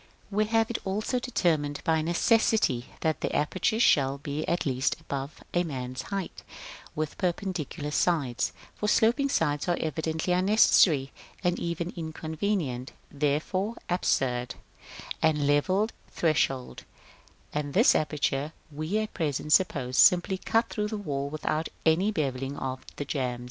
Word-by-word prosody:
§ -, -, -26 dB
III. -, -, -28 dB, 0.2 s
We 210 Hz, +2 st, +2 dB
have 225 Hz, +1 st, +1 dB
it 235 Hz, -, -2 dB
also 215 Hz, +6 st, -1 dB
determined 160 Hz, -, 0 dB
by 160 Hz, -1 st, +2 dB
necessity, 170 Hz, -, +2 dB
that 155 Hz, -3 st, 0 dB
the -, -, -1 dB
apertures 185 Hz, +9 st, +1 dB
shall 135 Hz, -1 st, +4 dB
be 145 Hz, +2 st, -4 dB
at 170 Hz, -, 0 dB
least 130 Hz, -1 st, 0 dB
above 140 Hz, +1 st, -6 dB
a 175 Hz, -, +2 dB
man's 130 Hz, -5 st, -4 dB
height, 195 Hz, +4 st, -5 dB, 0.5 s
with 155 Hz, -1 st, -3 dB
perpendicular 175 Hz, -5 st, -2 dB
sides 145 Hz, -7 st, +1 dB, 0.2 s
(for 210 Hz, -, -3 dB
sloping 240 Hz, +7 st, +3 dB
sides 150 Hz, -, 0 dB
are 175 Hz, -, +1 dB
evidently 160 Hz, +3 st, -1 dB
unnecessary, 180 Hz, -7 st, +4 dB, 0.3 s
and 175 Hz, 0 st, +1 dB
even 170 Hz, +1 st, -3 dB
inconvenient, 160 Hz, -4 st, -3 dB, 0.2 s
therefore 155 Hz, +9 st, -1 dB, 0.2 s
absurd) 125 Hz, -8 st, 0 dB, 0.7 s
and 150 Hz, -2 st, +2 dB
level 185 Hz, +9 st, +2 dB, 0.2 s
threshold; 135 Hz, -, 0 dB, 0.7 s
and 145 Hz, -1 st, -3 dB
this 230 Hz, +7 st, +6 dB
aperture 150 Hz, 0 st, 0 dB, 0.2 s
we 155 Hz, +7 st, -2 dB
at 215 Hz, 0 st, -2 dB
present 150 Hz, -2 st, -1 dB
suppose 135 Hz, -9 st, +2 dB
simply 180 Hz, +1 st, +5 dB
cut 225 Hz, +4 st, +1 dB
through 210 Hz, -1 st, -2 dB
the 215 Hz, 0 st, -4 dB
wall 140 Hz, -8 st, -3 dB
without 155 Hz, +1 st, -2 dB, 0.2 s
any 165 Hz, +6 st, +4 dB
bevelling 135 Hz, -5 st, -2 dB
of 130 Hz, 0 st, -4 dB
the 145 Hz, -, -4 dB
jambs. 125 Hz, -4 st, -2 dB
160 Hz, 140 wpm, -28 LUFS, 140-190 Hz, 0.7 s, this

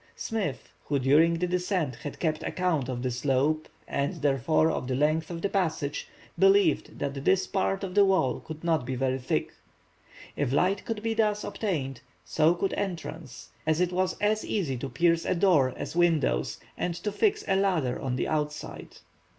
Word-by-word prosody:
Smith, 200 Hz, -, -4 dB
who 145 Hz, -, 0 dB
during 150 Hz, +6 st, +4 dB
the 175 Hz, +2 st, 0 dB
descent 180 Hz, -5 st, -1 dB
had 145 Hz, -, -7 dB
kept 155 Hz, -2 st, 0 dB
account 160 Hz, -7 st, -1 dB
of 125 Hz, -1 st, -3 dB
the 130 Hz, -, 0 dB
slope, 140 Hz, +5 st, 0 dB, 0.2 s
and 140 Hz, +6 st, -1 dB
therefore 150 Hz, +3 st, +3 dB
of 125 Hz, -, -3 dB
the 130 Hz, -, -1 dB
length 155 Hz, +3 st, +1 dB
of 170 Hz, -1 st, -6 dB
the -, -, +3 dB
passage, 160 Hz, -7 st, -1 dB, 0.3 s
believed 195 Hz, -4 st, +3 dB
that 140 Hz, -1 st, -3 dB
this 190 Hz, +4 st, +3 dB
part 195 Hz, 0 st, -1 dB
of 185 Hz, -2 st, -4 dB
the 205 Hz, +1 st, +6 dB
wall 190 Hz, -9 st, +2 dB
could 160 Hz, 0 st, -9 dB
not 165 Hz, -5 st, +1 dB
be 130 Hz, +1 st, -3 dB
very 130 Hz, +1 st, 0 dB
thick. 125 Hz, -, -2 dB, 0.8 s
If 140 Hz, -3 st, -1 dB
light 185 Hz, +8 st, +1 dB
could 220 Hz, -2 st, -4 dB
be 225 Hz, 0 st, 0 dB
thus 210 Hz, -2 st, +1 dB
obtained, 155 Hz, -, -3 dB, 0.2 s
so 155 Hz, -, +3 dB
could 195 Hz, +2 st, -1 dB
entrance, 165 Hz, -8 st, -5 dB, 0.2 s
as 155 Hz, 0 st, +2 dB
it 180 Hz, 0 st, +2 dB
was 185 Hz, 0 st, 0 dB
as 215 Hz, +1 st, +1 dB
easy 165 Hz, -11 st, -1 dB
to 135 Hz, +3 st, -5 dB
pierce 170 Hz, +1 st, +2 dB
a -, -, 0 dB
door 170 Hz, -8 st, +4 dB
as -, -, -5 dB
windows, 160 Hz, -, +2 dB, 0.2 s
and 175 Hz, -, -2 dB
to 195 Hz, +4 st, -3 dB
fix 425 Hz, -, +1 dB
a 195 Hz, -, +2 dB
ladder 180 Hz, -10 st, +1 dB
on 130 Hz, -2 st, -2 dB
the 125 Hz, -, -1 dB
outside. 150 Hz, -1 st, -4 dB
160 Hz, 185 wpm, -28 LUFS, 140-190 Hz, 0.8 s, the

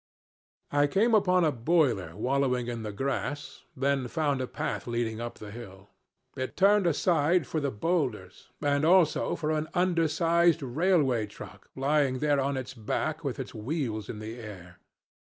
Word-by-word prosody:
"I 145 Hz, 0 st, +3 dB
came 215 Hz, +10 st, +2 dB
upon 185 Hz, -4 st, +4 dB
a 155 Hz, -, +3 dB
boiler 120 Hz, -, +1 dB
wallowing 125 Hz, +2 st, 0 dB
in 120 Hz, -1 st, -4 dB
the 105 Hz, -1 st, -5 dB
grass, 140 Hz, +5 st, -3 dB, 0.2 s
then 135 Hz, -1 st, 0 dB
found 145 Hz, -1 st, 0 dB
a 130 Hz, -, -2 dB
path -, -, -4 dB
leading 115 Hz, -1 st, -2 dB
up 120 Hz, 0 st, -6 dB
the 105 Hz, -1 st, -9 dB
hill. 100 Hz, -3 st, -11 dB, 0.4 s
It 130 Hz, 0 st, -5 dB
turned 200 Hz, 0 st, +4 dB
aside 165 Hz, 0 st, +2 dB
for 155 Hz, -, -2 dB
the 140 Hz, -2 st, -1 dB
bowlders, 115 Hz, -, -2 dB
and 145 Hz, 0 st, +2 dB
also 170 Hz, -1 st, +3 dB
for 155 Hz, -1 st, -2 dB
an 155 Hz, 0 st, -1 dB
undersized 170 Hz, -1 st, +2 dB
railway 135 Hz, -, +1 dB
truck 100 Hz, -, -12 dB
lying 140 Hz, -1 st, +1 dB
there 145 Hz, +1 st, +2 dB
on 135 Hz, 0 st, 0 dB
its 130 Hz, 0 st, -5 dB
back 150 Hz, +7 st, -3 dB
with 140 Hz, -3 st, -3 dB
its 130 Hz, -, -6 dB
wheels 110 Hz, -3 st, -3 dB
in -, -, -5 dB
the 110 Hz, +3 st, -7 dB
air. 90 Hz, -5 st, -10 dB
140 Hz, 160 wpm, -28 LUFS, 120-160 Hz, 0.4 s, upon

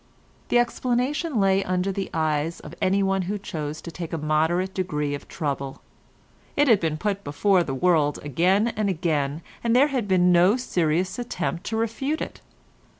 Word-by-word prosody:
The -, -, +4 dB
explanation 250 Hz, +4 st, 0 dB
lay 195 Hz, 0 st, +3 dB
under 185 Hz, +1 st, 0 dB
the 195 Hz, 0 st, -3 dB
eyes 155 Hz, +1 st, -1 dB
of 150 Hz, -, -10 dB
anyone 195 Hz, 0 st, +2 dB
who 205 Hz, -, -1 dB
chose 155 Hz, -5 st, -5 dB
to 170 Hz, -, -8 dB
take 170 Hz, -1 st, -6 dB
a 165 Hz, -, -2 dB
moderate 160 Hz, +5 st, +1 dB
degree 150 Hz, -6 st, -2 dB
of 145 Hz, -, -6 dB
trouble; 140 Hz, -3 st, -4 dB, 0.7 s
it 290 Hz, 0 st, +3 dB
had 225 Hz, -6 st, +6 dB
been 160 Hz, -2 st, -1 dB
put 200 Hz, +3 st, -2 dB
before 185 Hz, +6 st, +2 dB
the 135 Hz, -6 st, -2 dB
world 150 Hz, -1 st, +2 dB
again 185 Hz, -, +2 dB
and 215 Hz, -3 st, -1 dB
again, 155 Hz, -3 st, -1 dB, 0.2 s
and 235 Hz, 0 st, +2 dB
there 280 Hz, +4 st, +5 dB
had 255 Hz, -7 st, -1 dB
been 180 Hz, -2 st, +4 dB
no 180 Hz, +6 st, +5 dB
serious 180 Hz, -4 st, 0 dB
attempt 180 Hz, -7 st, -3 dB
to 220 Hz, -, -2 dB
refute 250 Hz, +7 st, -1 dB
it. -, -, -6 dB
185 Hz, 170 wpm, -24 LUFS, 155-210 Hz, 0.7 s, had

